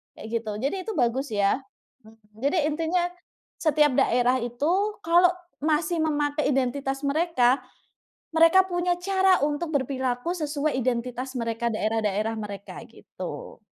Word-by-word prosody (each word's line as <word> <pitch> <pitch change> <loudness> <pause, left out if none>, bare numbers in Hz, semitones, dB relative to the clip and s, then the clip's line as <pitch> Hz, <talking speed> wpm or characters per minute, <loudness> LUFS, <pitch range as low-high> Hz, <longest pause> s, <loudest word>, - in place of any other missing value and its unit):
kayak 220 - -9
gitu, 220 -1 -6
jadi 275 +8 -1
itu - - -1
bagus 255 +2 +1
ya. 200 +6 +2 0.5
Mhm, 220 -1 -20 0.2
jadi 290 +6 +2
intinya 330 +3 0 0.6
setiap 300 -2 +3
daerah 250 +1 +3
itu 245 +7 -1 0.3
kalau 345 +2 +5 0.4
masih 320 +2 +1
memakai 295 -1 0
identitas 270 +1 -1
mereka, 280 -4 +2 0.8
mereka 330 +3 +6
punya 350 -1 0
cara 380 0 +3
untuk 300 +3 -2
berperilaku 260 +2 -1
sesuai 300 -3 -1
identitas 250 +1 -2
mereka, 230 0 -1
daerah-daerah 215 0 -1
mereka 200 -2 -7
gitu. - - -9
280 Hz, 120 wpm, -25 LUFS, 240-330 Hz, 0.8 s, mereka